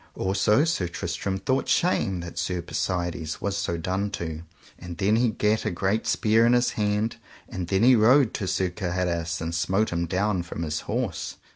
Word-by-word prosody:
Also 100 +7 +2
Sir 130 - 0
Tristram 95 +2 -3
thought 130 +6 -1
shame 95 - +1
that 85 0 -6
Sir 90 -2 -2
Persides 85 -3 -3
was 100 -1 -2
so 100 -4 -2
done 95 +4 -2
to; 80 -4 -5 0.4
and 90 -1 -8
then 100 +2 +2
he 120 +1 +3
gat 110 0 +1
a 110 - 0
great 100 +4 -1
spear 110 +1 +3
in 120 +1 +4
his 120 0 +3
hand, 105 +2 -1 0.3
and 90 -2 -5
then 95 +3 +1
he 125 +1 +7
rode 120 +3 +5
to 95 - -3
Sir 95 0 0
Gaheris 85 -3 -2
and 80 +1 -3
smote 95 +6 +1
him 85 0 -1
down 95 +1 0
from 85 -1 -6
his 80 -1 -2
horse. - - -2
95 Hz, 185 wpm, -25 LUFS, 85-110 Hz, 0.4 s, he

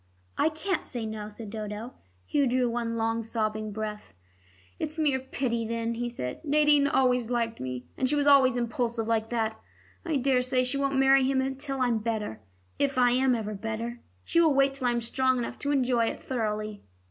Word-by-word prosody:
'" - - -37
"I - - +4
can't 345 +4 -2
say 240 -3 -5
'no,'" 215 -1 -5
said 210 0 -9
Dodo. 215 +2 -5 0.3
Hugh 285 -2 +2
drew 250 0 +2
one 230 -1 -2
long 225 0 0
sobbing 215 -1 -2
breath. 210 - -6 0.6
"It's 310 +1 -3
mere 290 -4 +2
pity 255 -3 -2
then," 230 0 -2
he 240 +1 -3
said. 125 - -5
"Nadine 295 -1 +4
always 250 -4 +2
liked 230 -2 -1
me, 125 -1 -5
and 260 - +1
she 295 - +1
was 290 -1 +1
always 270 -3 +6
impulsive 235 -1 -1
like 225 0 0
that. 220 -2 -2 0.4
I 330 -3 -1
daresay 255 -1 +2
she 255 +2 -1
won't 275 -1 0
marry 270 0 +5
him 265 0 +1
till 275 -1 -3
I'm 240 -3 +2
better, 215 - -3 0.4
if 280 -2 +1
I 245 -1 +5
am 255 0 +3
ever 215 -2 -3
better. 225 +3 -4 0.2
She 335 - +3
will 315 -4 +4
wait 275 0 +4
till 265 -2 -2
I - - +3
am 235 - 0
strong 260 +2 +1
enough 240 - -4
to 285 - -1
enjoy 250 -4 +2
it - - -3
thoroughly." 215 -4 -3
240 Hz, 195 wpm, -28 LUFS, 225-270 Hz, 0.6 s, always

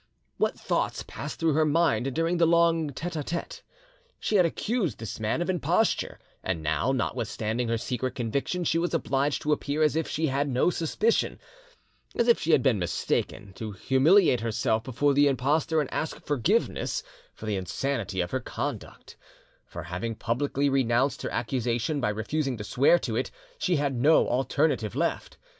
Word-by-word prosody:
What - - 0
thoughts - - -1
passed 145 +1 -7
through 165 -2 +2
her 155 +2 +3
mind 145 -6 +1
during 165 +2 +1
the 170 -1 +4
long 165 -2 +3
'tete 165 +5 -5
a 155 - -1
tete'? 170 +3 -5 0.6
She 210 - +1
had 180 -3 +5
accused 200 - -2
this 115 -1 -6
man 110 +10 0
of - - -6
imposture, 180 +5 0 0.3
and 85 -4 -2
now, 80 - +1
notwithstanding 115 -2 -2
her 115 0 0
secret 125 +2 -3
conviction, 140 +9 -2
she 165 0 +1
was 175 0 -1
obliged 140 -2 0
to 150 - 0
appear 150 +1 0
as 150 -1 +2
if 160 -1 0
she 160 - -1
had 140 0 0
no 130 +7 +2
suspicion, 195 +8 0 0.8
as 235 - +1
if 235 - +5
she 160 - -4
had 135 - +4
been 125 -7 +3
mistaken, 95 +2 -2
to 110 +1 -6
humiliate 135 - +4
herself 110 0 0
before 140 +3 +1
the 145 +1 +5
impostor, 145 +4 +1
and 145 - -2
ask 160 - -3
forgiveness 155 - 0 0.3
for - - -9
the 105 - -1
insanity 95 +1 -2
of 85 -1 -3
her - - 0
conduct; - - -6 0.5
for, - - -7
having 90 +6 -4
publicly 140 +5 0
renounced 135 0 +1
her - - -3
accusation 120 +4 -1
by 105 - +1
refusing 130 +5 -2
to 105 - -6
swear 135 +10 +4
to - - -3
it, - - -1 0.3
she 180 - +1
had 140 -2 0
no 145 +6 +4
alternative 130 - 0
left. - - -2
140 Hz, 175 wpm, -27 LUFS, 115-160 Hz, 0.8 s, had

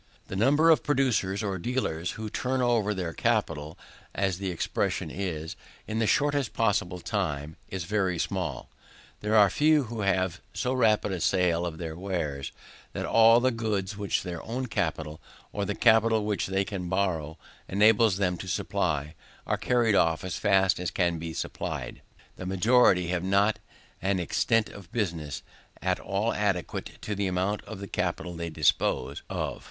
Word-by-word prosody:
The - - -4
number 145 +10 +5
of 160 - +4
producers, 120 -9 +1
or 95 -3 -2
dealers, 90 -7 -2
who 110 0 -5
turn 130 +4 -1
over 120 -4 +2
their 90 -5 -3
capital, 80 -11 -1 0.4
as 95 -2 0
the 95 -1 -2
expression 85 - -2
is, 80 -4 -4 0.3
in 110 +1 -3
the 110 - +2
shortest 145 -1 +1
possible 95 -5 0
time, 80 -7 -2
is 95 -2 -4
very 95 -1 0
small. 90 +1 -3 0.5
There 105 +1 0
are 105 -3 +6
few 150 -1 +4
who 115 -2 -5
have 95 -2 0
so 125 0 0
rapid 110 -5 +2
a 95 - -2
sale 90 -1 +2
for 80 - -11
their 80 -2 -5
wares, 80 -7 -3 0.4
that - - -3
all 115 +1 +6
the 130 +1 +2
goods 105 -3 -2
which 100 -1 -1
their 90 -2 -5
own 125 +3 -3
capital, 80 -8 -3 0.3
or 100 -1 -1
the 105 - -2
capital 110 -1 +4
which 105 -2 -1
they 95 +1 0
can 95 -3 -5
borrow, 85 -5 -1 0.3
enables 105 0 +4
them 90 -3 0
to 95 - -7
supply, 75 -3 -1 0.3
are - - +1
carried 120 -3 +2
off 80 -4 +2
as 95 -2 -3
fast 95 -3 +3
as 90 -2 -1
they - - -18
can 85 -2 0
be 85 0 -5
supplied. - - -5 0.4
The 90 - -6
majority 95 -2 +4
have 90 -1 -1
not 100 +3 +2 0.4
an 95 0 +1
extent 110 +5 +1
of 100 -4 -12
business, 85 - -3 0.4
at - - 0
all 100 +4 -1
adequate 100 -4 -2
to 105 - -2
the 100 -1 -1
amount 95 +3 -1
of 110 -3 -8
the 100 - -6
capital 90 -1 -2
they 85 0 -4
dispose 80 -2 +1
of. - - -3
95 Hz, 170 wpm, -28 LUFS, 90-110 Hz, 0.5 s, are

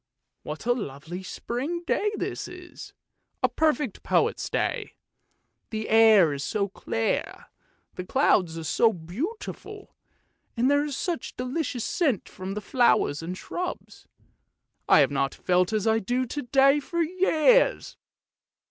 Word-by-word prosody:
What 155 +7 -7
a 245 - +3
lovely 170 - -6
spring 270 - -4
day 420 +4 0
this - - -4
is, 360 0 -11 0.5
a - - +6
perfect 300 -7 0
poet's - - 0
day! - - -2 0.7
the 220 -1 -4
air 220 -8 +6
is 140 0 -4
so 200 +3 -1
clear, 225 +3 -1
and - - -13 0.5
the 180 - -6
clouds 185 - +2
are 165 - -5
so 220 +9 +3
beautiful, 335 - -7 0.6
and 250 +4 +3
there 285 0 +3
is 290 -3 -4
such 350 -5 -3
a - - -50
delicious 255 -1 -3
scent 275 - 0
from 190 +1 -7
the 210 - -4
flowers 220 - +2
and 180 +3 -5
shrubs. 360 - -6 0.8
I - - +7
have - - +2
not 140 0 -1
felt 180 +1 +1
as 215 -1 -1
I 220 0 +3
do 245 +5 -1
to 290 +4 -4
day 275 +3 +4
for 340 +4 -1
years! 370 +7 +2
235 Hz, 145 wpm, -26 LUFS, 185-305 Hz, 0.8 s, I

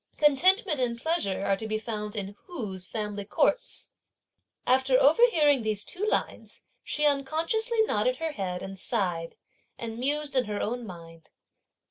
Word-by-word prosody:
Contentment 325 - +4
and 235 -2 -1
pleasure 235 - -1
are 195 - +2
to 220 +3 -4
be 215 0 -1
found 210 -1 -5
in 200 -1 -5
whose 200 - -4
family 210 -2 -4
courts? 210 - -1 0.8
After 260 +1 +3
overhearing 300 - +4
these 215 -2 -2
two 380 +2 -5
lines, 430 - -2 0.2
she 300 - 0
unconsciously 330 - +1
nodded - - 0
her 325 -1 -3
head, 185 -8 -4
and 195 0 -8
sighed, 175 -7 -2 0.4
and 230 0 -6
mused 290 +2 0
in 255 -2 +3
her 205 -1 -4
own 240 +1 -3
mind. 165 -3 -12
245 Hz, 145 wpm, -27 LUFS, 205-305 Hz, 0.8 s, Contentment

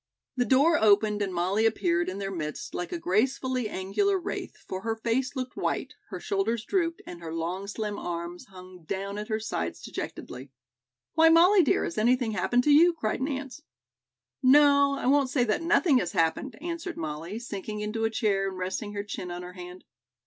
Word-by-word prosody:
The 245 -1 +1
door 285 +7 +4
opened 210 0 +4
and 195 -2 -1
Molly 185 +5 0
appeared 175 -5 0
in 185 - -5
their 195 -1 -4
midst 155 -5 -5
like 175 - -4
a 350 - -2
gracefully 255 - 0
angular 205 - 0
wraith, 375 +2 -5
for 185 - -4
her 225 +2 -2
face 240 +4 -1
looked 255 -1 -4
white, - - -2
her - - -6
shoulders 235 - -1
drooped 335 -1 -1
and 175 -1 -9
her 165 -1 -6
long 175 +4 -3
slim 210 0 -4
arms 170 0 -5
hung 185 -1 -13
down 195 +4 -4
at 210 - -5
her 215 -1 -1
sides 85 - -3
dejectedly. 130 +2 -7 0.6
"Why, 325 0 +6
Molly, 355 +4 +6
dear, 290 - +2
has 170 - -3
anything 240 +1 +2
happened 240 +5 +1
to 295 - +3
you?" 340 +4 +6
cried 225 -7 -2
Nance. 275 +1 -4 0.8
"No, 280 +1 +5
I - - -5
won't 275 0 +3
say 255 -2 +2
that 215 +3 0
nothing 330 -4 +3
has 175 -5 -3
happened," 170 - 0
answered 340 +2 -5
Molly, 160 +5 -5
sinking 210 -2 -6
into 215 +2 -3
a 225 - +2
chair 205 -4 0
and 190 - -8
resting 190 +3 -4
her 200 0 -3
chin 195 -3 -6
on 175 0 -6
her 180 0 -9
hand. 180 0 -10
215 Hz, 190 wpm, -27 LUFS, 185-270 Hz, 0.8 s, Why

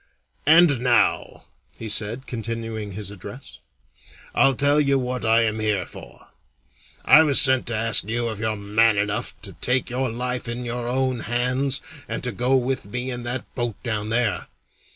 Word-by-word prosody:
"And 160 -4 +6
now," 120 -3 +1 0.3
he 115 - -7
said, 110 +5 0
continuing 115 -2 -5
his 100 0 -7
address, 105 +6 -11 0.7
"I'll 135 -1 +3
tell 145 +3 +3
you 140 -1 +2
what 125 -1 -3
I 115 +1 +4
am 110 -1 -1
here 110 -2 -1
for. - - -14 0.8
I 150 +4 +8
was 145 -4 +6
sent 130 -2 +5
to 120 - -1
ask 110 -1 +3
you 115 +2 -2
if 110 - -8
you're 110 0 -1
man 105 +2 +2
enough 105 +1 -3
to - - -8
take 125 -1 0
your 130 +1 -1
life 125 +1 -3
in 120 +1 -5
your 120 0 -4
own 130 0 -1
hands 125 +4 -1 0.3
and - - -4
to 125 - 0
go 125 +5 +1
with 130 -4 -1
me 125 +4 -4
in 120 -1 -5
that 120 +1 -3
boat 120 -4 -3
down 110 -3 -3
there? 115 -2 -1
120 Hz, 175 wpm, -23 LUFS, 110-130 Hz, 0.8 s, I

